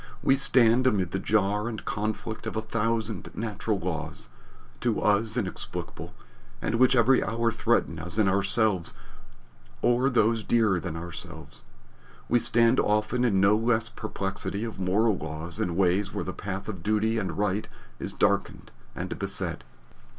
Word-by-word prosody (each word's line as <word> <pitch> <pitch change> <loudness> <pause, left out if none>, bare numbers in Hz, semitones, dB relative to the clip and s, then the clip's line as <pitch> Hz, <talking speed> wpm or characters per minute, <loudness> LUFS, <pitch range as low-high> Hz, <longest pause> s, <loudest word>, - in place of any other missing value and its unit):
We 135 - +5
stand 130 -2 +4
amid 95 -8 +1
the 95 - -1
jar 105 +1 +1
and 110 -2 -5
conflict 110 +1 -3
of - - -4
a 110 - 0
thousand 110 -1 -2
natural 110 -1 -2
laws, 80 -3 -4 0.5
to 120 -3 0
us 110 +2 +2
inexplicable, 100 -6 -5 0.4
and - - -2
which 130 +1 +5
every 125 +2 +4
hour 115 0 0
threaten 115 -7 0
us 85 +4 -2
in 110 -3 +4
ourselves 100 -1 +1 0.9
or 125 +3 +3
those 115 -3 +2
dearer 110 -6 +2
than 85 -2 -5
ourselves. 85 -1 -9 0.7
We 120 - +3
stand 115 +2 +3
often 105 +4 +1
in 105 -6 +3
no 100 +2 +5
less 115 0 +1
perplexity 100 0 -4
of 115 -4 -6
moral 100 +4 +2
law 80 +1 -5
in 85 -2 -1
ways 95 +2 +2
where - - -3
the 95 - -4
path 95 0 -5
of 95 -6 -5
duty 110 +3 +1
and 95 -3 -4
right 105 0 0 0.3
is - - -4
darkened - - 0 0.2
and - - -5
beset. - - -3
105 Hz, 150 wpm, -27 LUFS, 95-115 Hz, 0.9 s, We